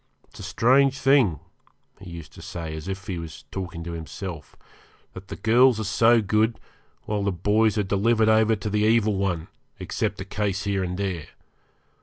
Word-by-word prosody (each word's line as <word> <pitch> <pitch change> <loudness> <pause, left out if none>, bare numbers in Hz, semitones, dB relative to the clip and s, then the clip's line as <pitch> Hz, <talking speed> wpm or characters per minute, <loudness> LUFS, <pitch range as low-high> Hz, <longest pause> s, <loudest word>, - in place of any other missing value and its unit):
It's - - -15
a - - -7
strange 135 +3 +3
thing,' 130 - +3 0.6
he - - -10
used 85 -2 -10
to - - -12
say, 80 -2 -6
as 80 +2 -8
if 95 0 -5
he 90 -3 -4
was 80 -2 -9
talking 85 -3 -5
to 85 - -6
himself, 80 -1 -7 0.6
'that 95 +1 -10
the - - -6
girls 120 +1 +4
are - - -2
so 115 +3 +4
good, 110 +3 +1 0.4
while 105 -1 -2
the 100 0 0
boys 105 +5 +2
are 105 - +2
delivered 110 +3 +2
over 110 0 +4
to 105 0 -4
the 105 - +1
Evil 110 0 +3
One, 90 -4 -1 0.3
except - - -3
a 95 - -5
case 100 -1 -2
here 100 -2 -1
and 90 0 -3
there. 95 -6 -3
100 Hz, 185 wpm, -24 LUFS, 90-110 Hz, 0.6 s, girls